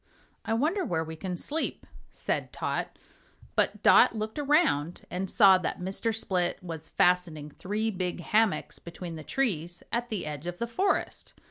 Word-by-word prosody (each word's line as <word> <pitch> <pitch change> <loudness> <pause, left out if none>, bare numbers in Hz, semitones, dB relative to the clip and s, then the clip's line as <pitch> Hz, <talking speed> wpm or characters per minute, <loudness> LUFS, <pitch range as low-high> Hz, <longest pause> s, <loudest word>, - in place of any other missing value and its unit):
"I 225 0 0
wonder 325 - +1
where 160 - -1
we 160 0 -7
can 180 +2 -4
sleep," 310 - -3 0.2
said - - -3
Tot. - - -3 0.6
But - - +1
Dot - - +7
looked 220 +5 -3
around 280 - +2
and 185 +1 -2
saw 195 -4 +7
that - - -2
Mr. 190 +5 -1
Split 185 -5 0
was 160 -2 -6
fastening 170 -5 +1
three 215 +7 -2
big 185 -2 -3
hammocks 215 +4 +1
between 170 0 -8
the 155 - -8
trees 175 - -2
at 240 +1 -1
the 210 -6 -3
edge 150 +1 -5
of 175 0 -4
the 235 - -1
forest. 380 +12 -1
185 Hz, 160 wpm, -28 LUFS, 170-225 Hz, 0.6 s, Dot